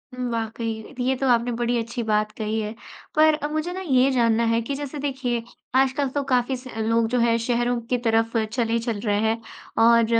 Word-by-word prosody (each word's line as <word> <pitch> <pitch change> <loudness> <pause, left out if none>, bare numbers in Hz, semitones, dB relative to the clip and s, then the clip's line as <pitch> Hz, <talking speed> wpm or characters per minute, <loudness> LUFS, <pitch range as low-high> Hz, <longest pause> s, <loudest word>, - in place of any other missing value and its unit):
हुँ, 250 -1 -3
वाक़ई। 225 +1 -4
ये 260 +1 +1
तो 270 - 0
आपने 240 0 +3
बड़ी 240 +1 0
अच्छी 230 +1 -3
बात 215 -1 +1
कही 220 0 -2
है। 215 +1 -3 0.4
पर 310 0 +5
मुझे 310 +3 -2
ना 380 - -5
ये 265 -5 +3
जानना 235 -2 +3
है 230 0 +2
कि 275 +4 -3
जैसे 290 +1 -5
देखिए 260 -4 -2 0.3
आजकल 270 +1 +2
तो 285 +2 -1
काफ़ी 255 -1 +1
स 255 +1 -12
लोग 225 +1 +2
जो 250 0 +1
है 230 0 +3
शहरों 240 +1 0
की 250 - +2
तरफ 225 +1 +2 0.2
चले 230 -1 0
चल 230 -3 -3
रहे 205 0 +2
हैं। 225 +1 0 0.4
और 230 0 +6
235 Hz, 200 wpm, -24 LUFS, 225-260 Hz, 0.4 s, और